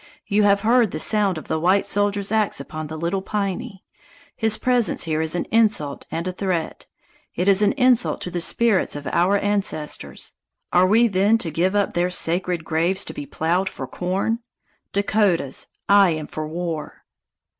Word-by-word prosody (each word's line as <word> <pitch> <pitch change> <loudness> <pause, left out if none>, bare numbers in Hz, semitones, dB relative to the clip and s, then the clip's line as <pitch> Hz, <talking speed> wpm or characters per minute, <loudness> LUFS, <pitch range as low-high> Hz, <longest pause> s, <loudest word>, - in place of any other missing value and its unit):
You 205 0 +1
have 200 -1 +3
heard 230 0 +3
the - - -5
sound 205 -5 +2
of 155 - -9
the 160 - -1
white 185 +4 +2
soldier's 205 0 0
ax 215 -7 +1
upon 155 +2 -6
the 155 +1 -7
Little 170 +4 -2
Piney. 200 +1 -4 0.5
His 220 -2 +1
presence 245 -6 +1
here 160 -2 -1
is 160 +1 -1
an 175 - -1
insult 210 -11 +1
and 165 +2 -4
a - - -1
threat. 180 -3 -3 0.5
It 180 - -1
is 200 0 +4
an 205 -1 +3
insult 255 -3 +2
to 180 - -5
the 175 - -2
spirits 220 0 +2
of 145 0 -7
our 185 +4 +2
ancestors. 200 -7 -3 0.4
Are 180 +1 +5
we 230 +4 +4
then 205 +2 +3
to 175 -8 -4
give 180 +6 0
up 205 -1 +1
their 175 +1 +1
sacred 175 -1 -1
graves 170 +4 0
to - - -5
be 145 - -7
plowed 175 +6 0
for - - -7
corn? 195 +6 -2 0.5
Dakotas, 200 -8 0 0.2
I 200 -2 +6
am 155 -2 -3
for 155 0 -6
war!" 165 -1 -5
190 Hz, 175 wpm, -22 LUFS, 170-205 Hz, 0.5 s, I